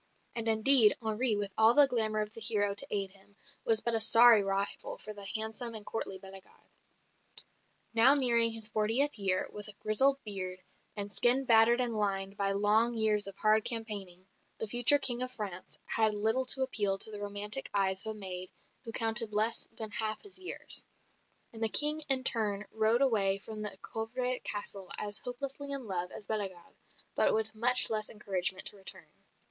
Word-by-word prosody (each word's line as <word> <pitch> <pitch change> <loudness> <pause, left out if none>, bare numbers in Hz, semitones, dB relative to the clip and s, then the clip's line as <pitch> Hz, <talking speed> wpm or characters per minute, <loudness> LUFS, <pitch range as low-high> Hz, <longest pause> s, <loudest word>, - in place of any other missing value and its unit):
And 230 -1 -2
indeed, 220 0 +6
Henri, 220 0 -1
with 205 -1 -3
all 225 +2 +5
the 290 - +7
glamour 220 -4 0
of 210 0 -6
the 225 - -9
hero 210 -3 +2
to 200 - -4
aid 195 -2 -2
him, 200 +1 -21 0.3
was 225 -1 +1
but 235 - -2
a 225 - +3
sorry 230 0 +6
rival 195 0 -4
for 215 - -10
the 200 -1 -10
handsome 220 +2 -3
and 210 -1 -9
courtly 195 -3 -3
Bellegarde. 190 0 -16 1.2
Now 235 +5 +5
nearing 235 -4 +2
his 225 -1 -4
fortieth 225 +5 +1
year, 190 -2 -1
with 210 0 -6
grizzled 265 +6 +2
beard, 185 -3 -6 0.3
and 205 -1 -6
skin 245 +7 +2
battered 230 +1 +4
and 240 -2 -1
lined 195 -2 -3
by 200 -1 -1
long 210 +4 +1
years 215 -2 +1
of 195 0 -10
hard 215 0 +1
campaigning, 210 -6 -4 0.3
the - - -3
future 240 +6 +3
King 250 -3 +3
of 255 0 -2
France 195 -6 -8
had 220 -1 0
little 225 +5 -1
to 265 +1 +7
appeal 205 -7 -1
to 220 - -3
the 210 - -8
romantic 205 +5 -3
eyes 190 -1 -1
of 220 0 -5
a - - -13
maid 185 -2 -7 0.3
who 230 - -8
counted 225 -1 +1
less 220 +2 +1
than 220 -1 -2
half 215 +1 -4
his 400 -3 -6
years; 370 - +2 0.7
and 225 - -9
the 225 - +3
King 300 +6 +7
in 265 -1 +6
turn 210 -5 0
rode 220 +4 +1
away 200 -7 +1
from 215 +1 -10
the 210 -2 -5
Coeuvres 250 +3 -4
Castle 200 -2 -6
as 205 0 -3
hopelessly 275 +3 -6
in 275 -3 -4
love 180 -3 -5
as 210 - -9
Bellegarde, 195 -5 -6 0.4
but - - +1
with 220 0 -3
much 245 +2 +2
less 215 -1 -2
encouragement 190 -3 -3
to - - 0
return. 190 -3 -8
215 Hz, 185 wpm, -30 LUFS, 200-235 Hz, 1.2 s, the